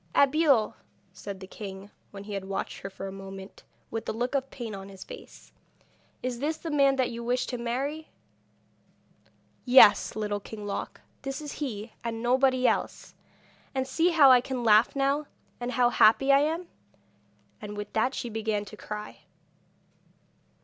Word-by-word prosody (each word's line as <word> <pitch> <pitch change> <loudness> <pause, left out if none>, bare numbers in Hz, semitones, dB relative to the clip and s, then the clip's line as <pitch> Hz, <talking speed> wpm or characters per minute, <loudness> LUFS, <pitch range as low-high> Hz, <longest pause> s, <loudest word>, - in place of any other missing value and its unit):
'Abeille,' 280 -5 +4 0.4
said 200 -2 -8
the - - -7
king, 195 0 -9 0.2
when 195 -1 -9
he 205 0 -7
had 195 -1 -4
watched 195 0 -4
her 195 - -6
for 195 0 -8
a 195 - -5
moment, 195 0 -10 0.3
with 225 0 -4
a - - +1
look 240 +4 -2
of 270 -1 -1
pain 235 -4 -6
on 195 0 -8
his 195 -1 -10
face, - - -12 0.7
'is 250 -1 -3
this 310 +4 -1
the 330 - -6
man 275 -2 +4
that 260 -2 0
you 235 0 -6
wish 245 +1 0
to 250 - -4
marry?' 275 +7 -3 1.5
'Yes, 235 -7 +7
Little 210 -1 -2
King 210 +1 -9
Loc, 200 - -5 0.2
this 270 +1 -4
is 300 -2 -6
he 220 -5 -4
and 230 0 -4
nobody 255 +1 +3
else! - - -2 0.6
And 260 0 -1
see 325 +6 +2
how 300 -6 +7
I 250 -1 +7
can 255 -1 -4
laugh 220 +2 +5
now, 280 +2 +1 0.3
and 245 +1 -3
how 245 -1 +3
happy 270 +6 +5
I 275 - +7
am!' 325 +4 -1 0.9
And 210 -1 -7
with 205 0 -6
that 250 +4 +1
she - - -4
began 220 -2 -2
to 215 - -11
cry. 210 0 -7
240 Hz, 170 wpm, -28 LUFS, 210-270 Hz, 1.5 s, Yes